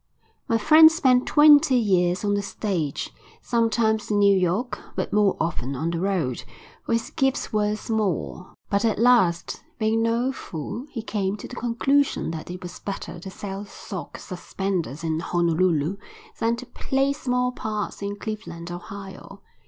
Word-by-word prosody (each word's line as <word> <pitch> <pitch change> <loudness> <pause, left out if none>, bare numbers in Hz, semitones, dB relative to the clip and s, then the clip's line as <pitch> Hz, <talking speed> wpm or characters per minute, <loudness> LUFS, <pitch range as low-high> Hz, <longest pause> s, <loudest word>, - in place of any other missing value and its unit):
My 230 - +2
friend 315 +7 +8
spent 260 -6 +3
twenty 295 -2 +6
years 185 -4 +2
on 205 - +2
the 205 - +1
stage, 185 -8 -3 0.3
sometimes 225 -2 +1
in 210 - +1
New 200 -1 +5
York, 190 +7 0 0.2
but - - -3
more 205 -2 +3
often 140 -5 -2
on 160 +6 -2
the 170 - -2
road, 175 -10 -1 0.4
for - - -2
his 230 - -1
gifts 270 -5 0
were 210 0 +1
small; 210 -4 -2 0.2
but 200 0 0
at 225 -2 +1
last, 225 -8 +3 0.2
being 220 0 +1
no 230 +3 +1
fool, 235 - -6
he 230 -6 -6
came 205 -2 -2
to - - -8
the 250 - -9
conclusion 260 -2 +1
that 160 0 -7
it 180 +1 -7
was 180 0 -8
better 195 -3 -6
to 190 - -8
sell 195 +1 -6
sock 195 -2 -8
suspenders 180 -5 -4
in 160 -1 -1
Honolulu 170 0 +1 0.4
than 230 +1 +1
to 245 +2 -8
play 270 +2 0
small 250 -3 0
parts 215 -5 -4
in 200 0 -3
Cleveland, 205 -5 -6
Ohio. 195 +2 -9
205 Hz, 160 wpm, -24 LUFS, 180-235 Hz, 0.4 s, friend